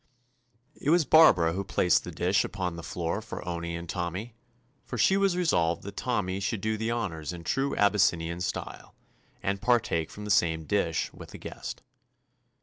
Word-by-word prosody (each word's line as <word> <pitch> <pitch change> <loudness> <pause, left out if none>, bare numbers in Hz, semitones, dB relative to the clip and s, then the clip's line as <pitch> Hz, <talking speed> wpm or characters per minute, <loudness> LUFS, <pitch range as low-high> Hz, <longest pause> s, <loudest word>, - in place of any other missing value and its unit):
It 145 - -3
was 170 -1 +4
Barbara 90 - +6
who 95 +2 -2
placed 90 -2 +2
the - - -7
dish 95 +2 +2
upon 90 -3 -3
the 85 - -7
floor 85 +4 -3
for 110 - -8
Owney 85 -1 -3
and 85 0 -6
Tommy, 90 +6 -4 0.5
for 125 - -6
she 190 - +4
was 195 -2 +2
resolved 85 - +1
that 100 +1 -8
Tommy 100 -7 -1
should 100 +2 -2
do 110 +2 -1
the 110 +1 -2
honors 90 -10 -3
in 85 -1 -8
true 135 +8 0
Abys 100 0 +3
sinian 85 +1 -5
style, 90 - -5 0.5
and 100 0 -1
partake 110 -10 +1
from 105 - -9
the 105 - -2
same 80 -4 +2
dish 85 -2 0
with - - -11
the - - -9
guest. - - -7
95 Hz, 180 wpm, -28 LUFS, 85-110 Hz, 0.5 s, Barbara